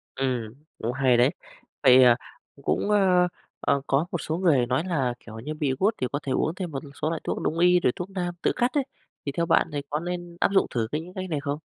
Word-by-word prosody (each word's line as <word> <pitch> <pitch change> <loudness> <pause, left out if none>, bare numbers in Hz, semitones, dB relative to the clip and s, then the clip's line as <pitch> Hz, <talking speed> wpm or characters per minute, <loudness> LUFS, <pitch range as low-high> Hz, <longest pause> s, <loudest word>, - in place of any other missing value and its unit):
Ừm, 125 -5 -2 0.2
cũng 115 - -2
hay 130 -3 +3
đấy! 125 +3 +5 0.5
Vậy, 130 0 +8
à, 120 -1 +7 0.4
c - - -16
cũng, 205 - 0
ơ, 185 -3 +4 0.3
ờ, 140 - +1
có 140 +5 +2
một 175 - -1
số 160 +2 -2
người 150 -10 +3
nói 130 +6 0
là 135 -9 0
kiểu 110 -1 -10
như 150 +6 -5
bị 145 -3 -1
gút 215 +3 +2
thì 125 - +1
có 145 - -1
thể 135 - -3
uống 160 +5 0
thêm 180 -4 -4
một 135 - -3 0.2
số 155 - +1
loại 165 - -3
thuốc - - -3
đông 165 - -1
y, 180 0 +5
rồi 125 - +2
thuốc 180 +2 -5
nam 175 -2 -3
tự - - +2
cắt 245 +1 +1
ấy, 285 -2 +2 0.4
thì 140 - -1
theo 170 +4 -1
bạn 165 0 +3
thì 145 - -1
có 150 - -1
nên 175 0 -5
áp - - +2
dụng 195 - +4
thử 115 -3 -1
cái 150 +1 -1
những 180 +2 -11
cách 185 -1 -5
này 150 -3 -1
không? 140 0 -2
155 Hz, 265 wpm, -26 LUFS, 130-180 Hz, 0.5 s, Vậy